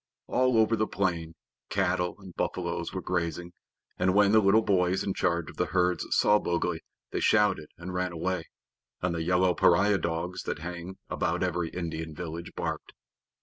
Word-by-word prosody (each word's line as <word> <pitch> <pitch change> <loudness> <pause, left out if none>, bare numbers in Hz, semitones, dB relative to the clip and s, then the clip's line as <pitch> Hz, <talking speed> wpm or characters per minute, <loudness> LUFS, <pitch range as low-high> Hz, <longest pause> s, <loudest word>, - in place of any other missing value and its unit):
All 130 -2 +2
over 110 +1 +4
the 110 -1 0
plain, 85 -4 -1 0.3
cattle 90 -2 0
and 95 -3 -12
buffaloes 85 -1 -2
were 95 -1 -5
grazing, 85 0 -2 0.5
and 90 +1 +2
when 100 -1 +5
the 110 - +6
little 105 +2 +4
boys 95 -2 +2
in 95 - -1
charge 85 -3 0
of - - -20
the - - +1
herds 90 0 +1
saw 105 0 +4
Mowgli 85 -1 -1 0.3
they - - -1
shouted 100 -8 +3
and 90 +2 -7
ran 90 0 -1
away, 85 0 -2 0.6
and 90 -1 +1
the 85 - -2
yellow 90 +2 +3
pariah 95 +4 +4
dogs 85 +2 -2
that - - -2
hang 90 +3 -7
about 90 0 -1
every 90 -2 -1
Indian 80 -3 -5
village 85 0 -6
barked. - - -4
90 Hz, 170 wpm, -28 LUFS, 85-95 Hz, 0.6 s, the